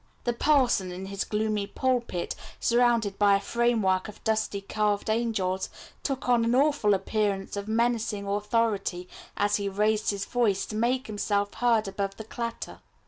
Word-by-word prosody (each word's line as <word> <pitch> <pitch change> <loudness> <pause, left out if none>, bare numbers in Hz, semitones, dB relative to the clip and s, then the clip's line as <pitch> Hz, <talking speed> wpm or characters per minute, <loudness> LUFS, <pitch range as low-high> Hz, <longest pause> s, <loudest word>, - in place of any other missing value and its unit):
The 240 - 0
parson 240 -8 +2
in 185 +2 -6
his 195 0 -3
gloomy 210 -1 -1
pulpit, 240 -6 -1 0.3
surrounded 235 -4 +2
by 200 -1 +5
a - - +2
framework 215 -4 +1
of 210 - -12
dusty 220 -2 0
carved 210 +1 0
angels, 205 -5 -1 0.3
took 270 -3 -3
on 240 -2 +4
an 230 +1 +2
awful 275 -7 +3
appearance 195 0 -1
of 200 0 -4
menacing 225 -2 0
Authority 205 -3 0 0.3
as 205 0 +2
he 200 -1 -2
raised 210 +2 +1
his 200 -1 -2
voice 220 -6 +1
to 215 - -7
make 250 +4 +1
himself 205 -1 -1
heard 230 -3 +2
above 195 0 -3
the 220 - -6
clatter. 230 +1 -5
215 Hz, 155 wpm, -27 LUFS, 200-235 Hz, 0.3 s, by